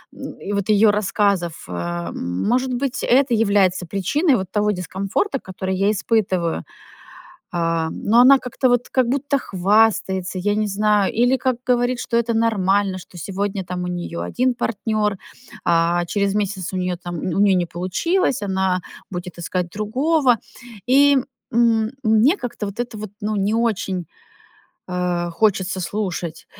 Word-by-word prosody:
и 205 - -7
вот 200 0 -1
ее 215 0 +5
рассказов, 200 -4 0
э 85 -1 -4
Может 240 - -1
быть, 255 +1 -2
это 260 0 +3
является 200 -5 +2
причиной 255 - +1
вот 190 -4 -3
того 210 0 +1
дискомфорта, 195 - -2
который 190 0 -4
я 200 +2 +2
испытываю. 190 -5 0 0.9
А, 165 -1 0
но 230 +4 +2
она 270 +2 +8
как-то 255 +1 -1
вот, 245 0 +1
как 255 -2 +2
будто 280 +2 0
хвастается, 195 -2 +1
я 205 +3 0
не 215 0 0
знаю. 210 0 +1
Или 260 +2 +3
как 255 -2 0
говорит, 245 0 +1
что 235 -1 0
это 235 0 0
нормально, 200 -3 +1
что 180 - -14
сегодня 195 +1 -3
там 180 0 -4
у - - -3
нее 175 -1 -4
один 255 0 0
партнер, 215 -3 -1 0.5
а 170 +1 +2
через 200 +1 0
месяц 195 -3 -2
у 190 - -3
нее 180 -1 -1
там, 175 -1 -5
у 185 +4 -1
нее 200 -2 +5
не 180 -1 +1
получилось, 210 - -1
она 190 -2 0 0.3
будет 175 -1 -7
искать 175 +1 -2
другого. 255 - +2 0.5
И, 280 +2 +5 0.4
м, 225 -2 +3
мне 220 - +4
как-то 240 - -5
вот 200 +3 -6
это 240 -3 -4
вот, 210 -1 -6
ну 210 +1 -1
не 200 +2 0
очень, 195 -6 -1 0.8
э, 180 -1 -1
хочется 190 +1 +1
слушать 180 -4 -4
205 Hz, 150 wpm, -21 LUFS, 180-230 Hz, 0.9 s, она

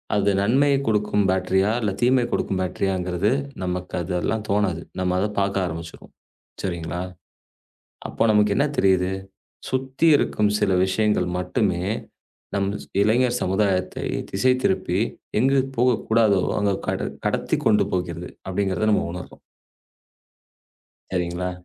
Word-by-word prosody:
அது 100 0 +3
நன்மையை 135 +6 +3
கொடுக்கும் 105 -1 +1
பேட்டரியா? 95 +2 +2
இல்ல 105 -3 0
தீமையை 125 0 +3
கொடுக்கும் 95 - -1
பேட்டரியா? 95 +1 -1
அப்படிங்கிறது 90 +4 0 0.3
நமக்கு 90 0 -4
அதெல்லாம் 95 +5 -2
தோணாது. 100 -5 +1 0.2
நாம 90 0 0
அத 105 - +1
பாக்க 100 0 0
ஆரம்பிச்சுருவோம். 85 0 -8 0.5
சரிங்களா? 85 -1 -3 1.1
அப்போ - - -1
நமக்கு 105 -1 +3
என்ன 140 - +3
தெரியுது? 95 -1 +3 0.6
சுத்தி 130 +4 -1
இருக்கும் 105 -1 +1
சில 100 - +2
விஷயங்கள் 95 -1 +1
மட்டுமே 90 -1 0 0.7
நம் 100 0 +1 0.3
இளைஞர் 120 +3 +2
சமுதாயத்தை 95 -1 0 0.3
திசை 125 +6 +3
திருப்பி - - +1 0.4
எங்குப் 135 +1 +2
போகக்கூடாதோ 110 -5 +3 0.2
அங்க 100 -1 +2 0.2
கட - - -1 0.2
கடத்திக் - - -1
கொண்டு 105 - +4
போகிறது 90 -1 -3 0.2
அப்படிங்கறத 95 +2 0
நாம - - +2
உணர்றோம். 90 0 -9 1.7
சரிங்களா? 90 0 -2
100 Hz, 115 wpm, -23 LUFS, 90-110 Hz, 1.7 s, கொண்டு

